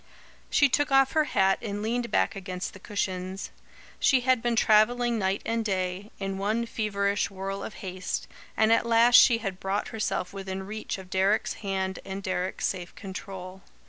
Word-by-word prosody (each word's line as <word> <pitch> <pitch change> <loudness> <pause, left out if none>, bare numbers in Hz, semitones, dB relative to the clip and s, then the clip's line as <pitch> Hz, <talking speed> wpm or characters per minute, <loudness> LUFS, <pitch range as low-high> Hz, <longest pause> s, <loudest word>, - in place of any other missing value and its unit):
She 290 - +5
took 290 +2 +1
off 270 0 +5
her 310 -1 +2
hat 195 -7 +2
and 205 -2 -4
leaned 235 +2 -1
back 95 - +1
against 185 -1 -5
the 190 - -12
cushions. 190 -1 -3 0.5
She 265 -3 +4
had 255 -1 +2
been 240 -1 0
travelling 230 +2 +3
night 190 0 0
and 230 0 0
day, 190 0 -2
in 195 -1 -4
one 215 +4 0
feverish 200 -3 -1
whirl 195 0 -5
of - - -7
haste, 185 0 -4 0.3
and 220 +1 +5
at 230 - +2
last 235 +1 +5
she 245 -2 +7
had 195 -5 -5
brought 195 +2 -2
herself 215 -4 -2
within 190 -1 -5
reach 215 +1 -5
of 185 -1 -12
Deryck's 195 +3 +2
hand 190 -2 -2
and 195 +1 -6
Deryck's 185 0 -2
safe 180 -2 -3
control. 190 -1 -8
200 Hz, 175 wpm, -27 LUFS, 190-230 Hz, 0.5 s, she